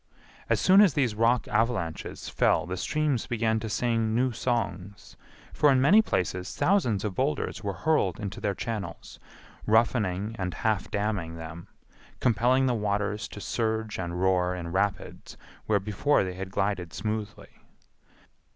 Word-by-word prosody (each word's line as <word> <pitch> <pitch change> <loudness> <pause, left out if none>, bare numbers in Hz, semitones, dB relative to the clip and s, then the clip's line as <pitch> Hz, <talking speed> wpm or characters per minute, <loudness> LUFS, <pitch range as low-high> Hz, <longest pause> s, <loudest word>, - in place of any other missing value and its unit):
As - - +2
soon 190 +2 +6
as 190 -9 +4
these 130 -6 +1
rock 115 +2 +2
avalanches 105 -9 -2
fell - - +2
the 90 +1 -4
streams 150 +2 -1
began 110 -1 0
to 110 0 -5
sing 115 +1 0
new 125 +2 +2
songs; 105 -5 -3 0.4
for 150 - +4
in 130 - +4
many 185 +12 +6
places 90 - -2
thousands 125 - +2
of 105 - -2
boulders 75 -4 -2
were 100 -1 -2
hurled 150 - +2
into 105 +3 -5
their 100 -1 -1
channels, 110 -3 -6 0.5
roughening 110 -2 +1
and 90 -2 -3
half 110 -3 -1
damming 100 -6 -2
them, 80 +1 -9 0.5
compelling 125 +3 +3
the 125 - +2
waters 105 -1 -1
to - - -10
surge 110 0 -2
and 85 -1 -3
roar 90 -1 +2
in 85 -2 -6
rapids 100 +2 -2 0.3
where 105 -2 +3
before 105 +8 +1
they 95 0 -5
glided 95 -3 -2
smoothly. 110 -1 -5
105 Hz, 145 wpm, -27 LUFS, 95-120 Hz, 0.5 s, soon